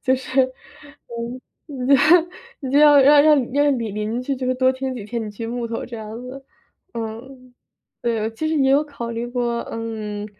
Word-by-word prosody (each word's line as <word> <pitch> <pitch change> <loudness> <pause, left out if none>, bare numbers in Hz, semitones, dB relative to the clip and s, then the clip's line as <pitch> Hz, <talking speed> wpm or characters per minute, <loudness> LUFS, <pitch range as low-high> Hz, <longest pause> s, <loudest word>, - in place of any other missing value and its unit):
就 260 0 +2
是， 260 +1 +1
嗯， 255 -2 -8 1.2
你 265 -4 -5
就 280 - +3
要 295 -1 +7
让 285 +2 +7
让 290 -5 +3
让 285 -1 +2
你 230 -2 -3
邻 215 +4 -3
居 275 +2 -2
就 255 -1 -4
是 255 - +1
多 260 0 +3
听 260 0 -4
几 230 -5 -7
天 230 +2 -4
你 - - -6
锯 225 +2 -7
木 235 +1 -3
头， 230 - -4
这 240 - -8
样 220 +1 -8
子。 260 +2 -9 0.5
嗯， 245 +3 -8 0.5
对， 225 -2 -1
其 310 +8 -3
实 320 - 0
也 270 -2 +3
有 280 +2 +4
考 260 -6 -7
虑 230 +1 -4
过， 240 -1 -2
嗯， 215 -2 -5
250 Hz, 200 characters per minute, -21 LUFS, 230-270 Hz, 1.2 s, 要